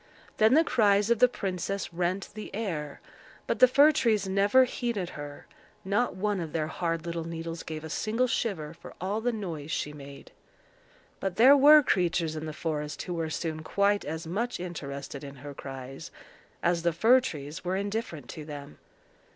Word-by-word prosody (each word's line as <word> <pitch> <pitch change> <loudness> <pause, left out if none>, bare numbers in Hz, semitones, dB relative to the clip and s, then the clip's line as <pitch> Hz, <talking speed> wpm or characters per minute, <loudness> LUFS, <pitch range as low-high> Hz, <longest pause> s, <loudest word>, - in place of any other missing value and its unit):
Then 220 +5 +5
the 320 - +6
cries 210 -6 +3
of 235 - +3
the 250 - +7
princess 195 -4 -3
rent 180 +3 -1
the 215 0 -7
air, 165 -10 -4 0.4
but - - -1
the 255 - +9
fir 285 +4 +6
trees 220 -9 +1
never 200 +7 +4
heeded 235 -7 -2
her; 145 -1 -8 0.4
not 205 +3 +1
one 205 +1 -1
of 165 -3 -5
their 155 -2 0
hard 165 +1 -2
little 170 -1 -3
needles 165 0 -5
gave 155 -1 -6
a 160 - -7
single 225 +7 0
shiver 190 -11 -2
for 165 - -13
all 200 +4 -2
the 245 +2 +1
noise 170 -9 -5
she 150 -2 -2
made. 140 -1 -11 0.9
But 190 -2 -2
there 255 +7 +8
were 295 +2 +8
creatures 170 -6 +1
in 155 0 -5
the - - -4
forest 150 -1 -4
who 180 - -4
were 165 -2 -2
soon 155 0 -3
quite 200 +5 +1
as 160 +2 -5
much 215 +8 -2
interested 140 -5 -6
in 140 -1 -8
her 140 +2 -9
cries 135 -1 -8 0.5
as 170 0 +2
the 170 0 +1
fir 230 +10 +5
trees 150 - -6
were 180 +1 -1
indifferent 200 - -3
to 155 - -7
them. 145 - -9
175 Hz, 180 wpm, -28 LUFS, 155-215 Hz, 0.9 s, the